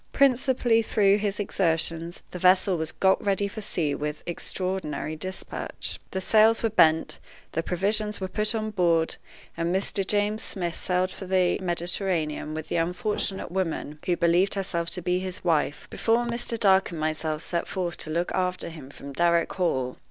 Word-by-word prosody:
Principally 255 -3 +3
through 205 -2 +3
his 205 0 -2
exertions, 165 -3 -1
the 180 - -6
vessel 185 +1 +4
was 160 -1 -2
got 190 0 +2
ready 200 0 +1
for 215 +2 -7
sea 160 -7 -1
with 150 +1 -4
extraordinary 175 -3 -3
dispatch. 185 +4 -5
The 190 - -3
sails 220 +4 +4
were 225 - +2
bent, 160 -5 +3 0.3
the 165 - -1
provisions 210 +5 +1
were 190 - -2
put 210 +3 0
on 215 -1 -2
board, 170 -4 +2 0.4
and 170 +1 -1
Mr. 195 +1 0
James 210 +1 +1
Smith 175 -6 -3
sailed 180 +1 0
for 190 - -8
the 185 -1 +2
Mediterranean 175 -3 -1
with 160 -1 -5
the - - -1
unfortunate 180 +3 -1
woman 165 -5 -2
who 175 -1 +2
believed 175 +4 +3
herself 170 -3 -2
to 180 - -2
be 180 0 +1
his 185 -1 -5
wife, 155 -3 +1
before 235 +1 +1
Mr. 235 -1 -1
Dark 195 -3 +4
and 170 - -6
myself 155 0 -2
set 170 -1 -2
forth 180 -3 -2
to - - -5
look 170 +3 -1
after 180 -2 -1
him 155 -5 -10
from 140 0 -10
Darrock 170 +2 +2
Hall. 130 -9 0
180 Hz, 170 wpm, -26 LUFS, 165-200 Hz, 0.4 s, vessel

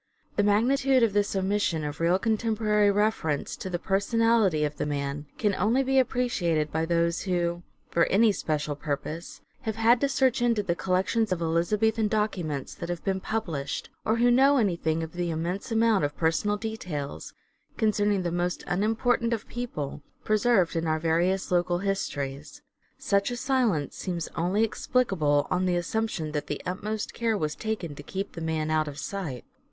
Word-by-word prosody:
The - - +3
magnitude 255 +5 +3
of 220 -4 +2
this 205 0 +1
omission 190 -4 0
of 150 0 -5
real 170 +2 +3
contemporary 215 -1 +2
reference 200 -8 0
to 190 - -5
the 175 - -1
personality 200 -2 +2
of 150 0 -4
the - - -2
man 145 0 -3
can 210 -2 +1
only 225 +8 +2
be 270 0 +3
appreciated 175 - 0
by 160 +1 -1
those 170 0 +1
who, 175 -1 0 0.3
for 170 - +3
any 215 +3 +4
special 150 -5 -2
purpose, 155 +3 -5 0.2
have 220 -5 -3
had 230 +2 +4
to 280 - +2
search 260 -3 +2
into 230 -3 +2
the 180 -3 0
collections 190 +5 0
of 185 - 0
Elizabethan 210 +7 +1
documents 185 -10 -2
that 170 - -7
have 175 -1 -4
been 190 -1 0
published, 165 -10 -3
or 220 - +2
who 240 +1 +4
know 270 +3 +5
anything 170 -7 +1
of 160 - -7
the 175 -1 -2
immense 175 +8 -3
amount 225 -5 +3
of 145 0 -2
personal 175 +6 +1
details, 170 - -5 0.4
concerning 205 -2 +2
the 175 - -1
most 175 +1 -1
unimportant 225 +5 +1
of 225 - -4
people, 190 - -5 0.2
preserved 215 -5 +2
in 165 0 -1
our 155 0 +1
various 170 +4 +1
local 175 0 +2
histories. 145 -7 -3 0.3
Such 200 +1 +1
a 245 - -4
silence 240 - 0
seems 175 -3 -3
only 180 +6 +1
explicable 190 - +1
on 185 0 +1
the 180 - +2
assumption 175 -2 -2
that 150 -1 -3
the 145 - -3
utmost 210 +4 -3
care 225 -2 0
was 155 -5 -1
taken 200 -4 -4
to 145 - -9
keep 195 +6 -5
the 165 - -8
man 160 -1 -1
out 155 -1 +1
of 145 -1 -7
sight. 160 - -5
190 Hz, 170 wpm, -27 LUFS, 160-220 Hz, 0.4 s, know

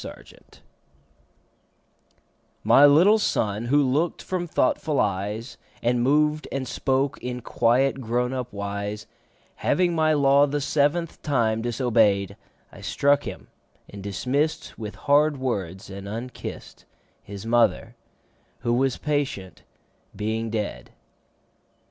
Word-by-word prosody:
The - - -6
Toys - - -16 2.0
MY 145 +1 +7
little 180 +10 +5
Son, 110 - -1
who 145 +4 +3
look'd 150 +7 0
from 180 -2 -3
thoughtful 150 0 0
eyes 105 +4 -2 0.2
And 120 +1 +2
moved 150 +4 +2
and 135 -1 -3
spoke 135 +3 -1
in 125 0 -5
quiet 130 +4 +1
grown 125 +2 -1
up 125 -1 -4
wise, 100 +1 -4 0.5
Having 175 -1 +1
my 155 -1 +2
law 140 0 +4
the 145 +1 -1
seventh 150 +4 0
time 115 -6 +1
disobey'd, 110 -5 +1 0.4
I - - -13
struck 145 0 +1
him, 95 -4 -8 0.4
and 100 - -10
dismiss'd 130 +10 -2
With 105 -2 -7
hard 145 +1 +2
words 100 -8 -3
and 100 0 -8
unkiss'd, 115 +4 -7
5 - - -24 0.4
—His 100 +1 -9
Mother, 115 0 +1 0.7
who 120 -1 0
was 130 +1 +1
patient, 140 -10 -3 0.5
being 110 +2 -2
dead. 105 -2 -4
125 Hz, 120 wpm, -24 LUFS, 110-145 Hz, 2.0 s, MY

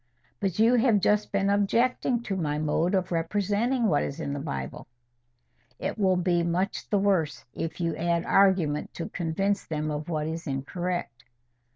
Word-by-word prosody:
"But 190 -4 -1
you 225 +3 +5
have 235 -3 +4
just 210 +2 +1
been 200 0 +1
objecting 235 +4 +1
to 200 - -2
my 150 -5 -1
mode 155 +4 +1
of 185 -1 -1
representing 205 +8 0
what 155 -9 +3
is 140 - -4
in 140 -3 -3
the 145 - -3
Bible." 65 - -5 0.9
"It - - -3
will 190 -2 +3
be 180 -1 +2
so 170 - -1
much 185 +3 -1
the 205 - +2
worse, 190 -6 +1
if 165 +1 -4
you 170 -2 -1
add 170 0 0
argument 180 -7 +2
to 165 - -5
convince 195 +4 -1
them 155 -1 -2
of 150 +2 -4
what 155 -2 -1
is 165 +1 -4
incorrect." 140 -2 -3
175 Hz, 175 wpm, -27 LUFS, 155-200 Hz, 0.9 s, you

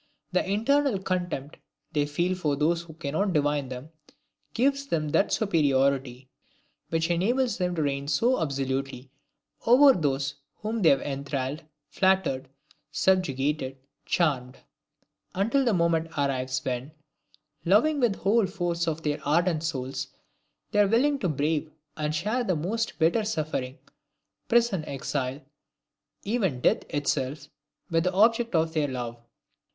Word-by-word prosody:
The 180 - +2
internal 255 +4 +2
contempt 180 -7 -3 0.3
they 145 -2 +1
feel 175 +5 0
for 155 -6 -1
those 165 +4 +1
who 165 -2 -13
cannot 165 +5 -1
divine 145 -3 +1
them, 130 +4 -8 0.6
gives 275 +3 +1
them 155 - -1
that 195 - +2
superiority 135 - +1 0.6
which 165 +1 0
enables 235 +9 +1
them 180 -1 0
to 160 - 0
reign 140 -1 -2
so 230 - +2
absolutely 135 -2 -3 0.6
over 270 +4 +8
those 140 - -1 0.2
whom 220 +1 -3
they 165 - +6
have 140 - +4
enthralled, 140 +1 -3 0.3
flattered, 185 -9 +1 0.4
subjugated, 145 -6 +1 0.3
charmed; 135 -7 0 0.8
until 230 +9 +2
the 240 - +2
moment 170 -3 +2
arrives 130 -2 -1
when 130 +3 -3 0.7
loving 225 - +3
with 240 -5 +3
the - - -12
whole 210 +1 +3
force 175 -3 -2
of 160 0 -2
their 150 -1 -1
ardent 165 +2 +2
souls, 135 -3 -3 0.6
they 210 - +2
are 205 - +6
willing 275 +7 +2
to 185 - 0
brave 155 +1 -1 0.2
and 150 0 -2
share 215 +10 0
the 185 -6 0
most 210 +9 -2
bitter 170 +7 +2
suffering, 155 -9 -3 0.7
prison, 230 -8 +2
exile, 135 -1 -3 0.8
even 195 - 0
death - - +3
itself, 145 0 -2 0.4
with 165 0 +2
the 180 - +1
object 230 +2 +3
of 160 0 +1
their 155 -2 +1
love! 120 -3 -5
160 Hz, 135 wpm, -27 LUFS, 140-195 Hz, 0.8 s, over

